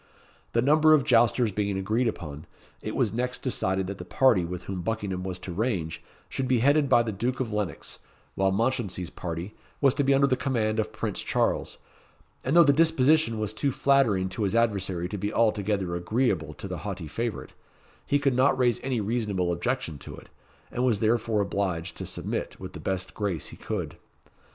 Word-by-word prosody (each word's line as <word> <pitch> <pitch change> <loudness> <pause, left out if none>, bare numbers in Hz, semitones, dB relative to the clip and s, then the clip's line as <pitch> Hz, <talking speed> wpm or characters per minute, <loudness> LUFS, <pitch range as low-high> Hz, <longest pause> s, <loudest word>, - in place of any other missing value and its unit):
The 115 - +2
number 155 +3 +6
of 145 - +2
jousters 120 -1 +3
being 100 0 -1
agreed 110 +6 0
upon, 80 -7 -5 0.3
it - - -4
was - - +1
next 125 +2 -2
decided 95 -7 0
that 100 0 -6
the - - -5
party 105 0 +3
with 90 +1 -5
whom 95 -1 -4
Buckingham 100 -2 -2
was 95 -1 -4
to 90 - -7
range 95 -6 -2 0.3
should 135 - -3
be 130 -1 +3
headed 140 +4 +3
by 120 - +5
the 115 - -3
Duke 120 +6 -2
of 120 -5 -2
Lennox; 105 -3 -3 0.3
while 95 0 +1
Mounchensey's 100 -5 -1
party 85 +4 -5 0.3
was 135 -3 +4
to 145 - 0
be 135 0 +4
under 140 +1 +4
the 135 -2 +2
command 115 -4 0
of 110 - -1
Prince - - -3
Charles; - - 0 0.7
and 135 +5 0
though 170 - +9
the 145 -2 +5
disposition 155 -5 +3
was 110 -1 -2
too 140 +6 0
flattering 125 -10 +3
to 90 +4 -5
his 100 +1 +1
adversary 95 -6 +1
to 105 +2 -5
be 105 +2 -2
altogether 105 -5 +1
agreeable 85 - 0
to 100 - -7
the 90 -2 -5
haughty 95 -5 -5
favourite, 115 +8 -4 0.5
he 145 - +2
could 140 -2 +1
not 130 +2 +3
raise 120 -3 +2
any 130 -3 -1
reasonable 105 -5 -1
objection 85 - -2
to - - -9
it, - - -14 0.4
and 125 - -1
was 120 -5 +2
therefore 110 -1 +1
obliged 95 -4 -2
to - - -5
submit - - -4
with 95 0 -8
the - - -7
best 95 -1 -3
grace 100 -7 -2
he - - -10
could. - - -4
110 Hz, 195 wpm, -27 LUFS, 95-125 Hz, 0.7 s, though